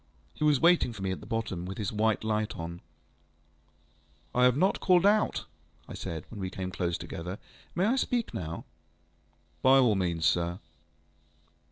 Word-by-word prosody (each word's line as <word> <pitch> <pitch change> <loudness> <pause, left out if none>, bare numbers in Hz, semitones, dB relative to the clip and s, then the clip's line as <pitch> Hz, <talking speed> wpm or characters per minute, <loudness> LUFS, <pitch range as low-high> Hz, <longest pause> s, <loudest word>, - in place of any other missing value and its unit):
He - - -5
was 150 -3 +4
waiting 170 -7 +4
for 100 -3 -7
me 95 - 0
at 95 - -4
the 105 - -12
bottom, 110 -6 -2
with 95 +1 -6
his 105 -3 -2
white 110 0 +1
light 110 -1 -1
on. 85 +1 -6 1.5
ŌĆ£I 125 0 +4
have 125 +1 +4
not 190 +5 +2
called 180 0 +4
out, 210 +1 +3 0.4
ŌĆØ - - -21
I - - -6
said, 80 -2 -5
when 110 - -8
we 95 -1 -3
came 95 0 -5
close 85 -1 -1
together; 90 +4 -6 0.4
ŌĆ£may 185 - +3
I 235 +5 +3
speak 245 -3 0
now? 80 -1 -5 1.0
ŌĆØ 130 - +5
ŌĆ£By 135 - +6
all 115 -4 +4
means, 85 -4 0
sir. 85 0 +1
105 Hz, 180 wpm, -29 LUFS, 90-135 Hz, 1.5 s, ŌĆ£By